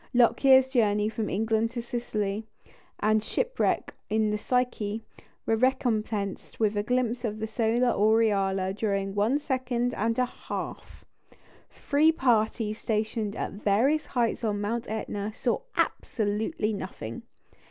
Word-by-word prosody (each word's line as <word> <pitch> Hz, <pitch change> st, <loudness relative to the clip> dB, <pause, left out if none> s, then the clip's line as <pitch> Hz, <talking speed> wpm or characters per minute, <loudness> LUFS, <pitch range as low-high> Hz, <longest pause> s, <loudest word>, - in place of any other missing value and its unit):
Lockyer's 260 Hz, +2 st, +6 dB
journey 210 Hz, -5 st, +2 dB
from 220 Hz, -1 st, -3 dB
England 220 Hz, +2 st, +1 dB
to -, -, 0 dB
Sicily, 220 Hz, -3 st, -3 dB, 0.5 s
and 215 Hz, 0 st, +3 dB
shipwreck -, -, 0 dB, 0.2 s
in 215 Hz, 0 st, +2 dB
the 210 Hz, -, 0 dB
Psyche, 225 Hz, -3 st, -1 dB, 0.4 s
were 225 Hz, -, +2 dB
recompensed 220 Hz, -5 st, -1 dB
with 215 Hz, -1 st, +2 dB
a 205 Hz, -, +1 dB
glimpse 245 Hz, +1 st, 0 dB
of 215 Hz, -2 st, -2 dB
the 220 Hz, -, -3 dB
solar 230 Hz, +2 st, +1 dB
aureola 200 Hz, -4 st, +2 dB
during 195 Hz, -2 st, -1 dB
one 210 Hz, +7 st, +2 dB
second 250 Hz, -4 st, -1 dB
and 225 Hz, +2 st, 0 dB
a 250 Hz, -, +3 dB
half! -, -, -7 dB, 0.6 s
Three 300 Hz, +3 st, +3 dB
parties 225 Hz, -5 st, +1 dB
stationed 215 Hz, -1 st, -1 dB
at -, -, -3 dB
various 235 Hz, +10 st, +1 dB
heights 235 Hz, -2 st, 0 dB
on 210 Hz, -2 st, 0 dB
Mount 230 Hz, +3 st, -2 dB
Etna 210 Hz, -1 st, -3 dB
saw 240 Hz, +2 st, 0 dB, 0.2 s
absolutely 215 Hz, +1 st, 0 dB
nothing. 115 Hz, -, -6 dB
220 Hz, 130 wpm, -27 LUFS, 210-245 Hz, 0.6 s, Lockyer's